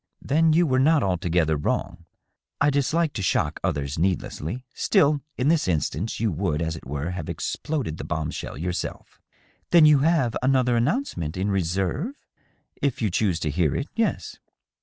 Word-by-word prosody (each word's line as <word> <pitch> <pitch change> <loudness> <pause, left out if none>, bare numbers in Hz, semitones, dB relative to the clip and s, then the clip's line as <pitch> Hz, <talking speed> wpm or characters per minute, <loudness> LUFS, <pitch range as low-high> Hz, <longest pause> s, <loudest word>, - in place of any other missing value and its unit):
" - - -51
Then 160 +1 +4
you 170 +2 +4
were 130 -4 +2
not 150 +3 +4
altogether 85 -4 +1
wrong. 85 +3 -2 0.5
I 145 +1 +3
dislike 150 +3 +1
to 105 - -4
shock 95 - 0
others 70 +1 -2
needlessly. 95 - -2
Still, 145 0 +2 0.2
in 130 - 0
this 160 - +2
instance, 85 +3 -1
you 110 -2 +1
would, 80 -2 -1
as 80 0 -2
it 80 - -10
were, 75 +5 -3
have 90 -4 -5
exploded 140 - -3
the - - -4
bomb 80 -1 -3
shell - - -6
yourself." 90 +3 -5 0.2
" - - -38
Then 170 -3 +7
you 150 -2 +6
have 145 -5 +2
another 130 -2 +2
announcement 115 - -1
in 100 +2 0
reserve 95 - -1 0.3
?" - - -39
" - - -35
If 140 -4 0
you 110 -4 0
choose 90 -3 +1
to 75 - -1
hear 80 +1 +1
it, 140 - -3
yes." 225 -1 -1
100 Hz, 180 wpm, -24 LUFS, -, 0.5 s, Then